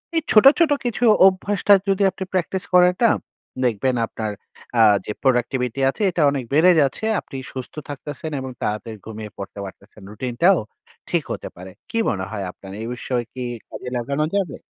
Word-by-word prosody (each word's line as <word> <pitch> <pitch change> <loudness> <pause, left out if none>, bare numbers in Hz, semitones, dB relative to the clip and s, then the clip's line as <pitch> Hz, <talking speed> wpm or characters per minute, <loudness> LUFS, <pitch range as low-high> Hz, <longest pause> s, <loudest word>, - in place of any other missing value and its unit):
এই 325 - +3
ছোট, 215 +2 +6
ছোট 325 -3 +4
কিছু 240 0 -2 0.2
অভ্যাসটা 200 +2 +2 0.2
যদি 195 +1 +2
আপনি 190 - -6
প্র্যাকটিস 185 +1 -1
করেন 180 0 +6
না, 230 - +6 0.5
দেখবেন 125 +2 +1
আপনার 110 -1 -4 0.5
আ - - +7 0.2
যে - - -4
productivity 125 0 0
আছে 135 - -5
এটা 165 - -1
অনেক 140 -2 -2
বেড়ে 165 +5 +6
যাচ্ছে, 140 +9 0 0.2
আপনি 135 - -9 0.2
সুস্থ 130 -1 -7 0.2
থাকতেছেন 145 +2 -6
এবং 130 0 -6
তাড়াতাড়ি 110 +1 -3
ঘুমিয়ে 110 -1 -7
পড়তে 100 +1 -8
পারতেছেন। 100 +2 -13
রুটিন 120 +3 -5
টাও 185 +2 +6 0.5
ঠিক - - +1
হতে - - -5
পারে। 95 +1 -10 0.2
কী 230 - -2
মনে 95 -3 -2
হয় 100 -3 -4
আপনার? 95 +1 -13
এই 115 - -4
বিষয়ে 125 -1 -2
কি 130 - -5 0.3
কাজে 125 - -7
লাগানো 140 +5 -1
যাবে? 180 -8 -2
130 Hz, 175 wpm, -22 LUFS, 110-180 Hz, 0.5 s, আ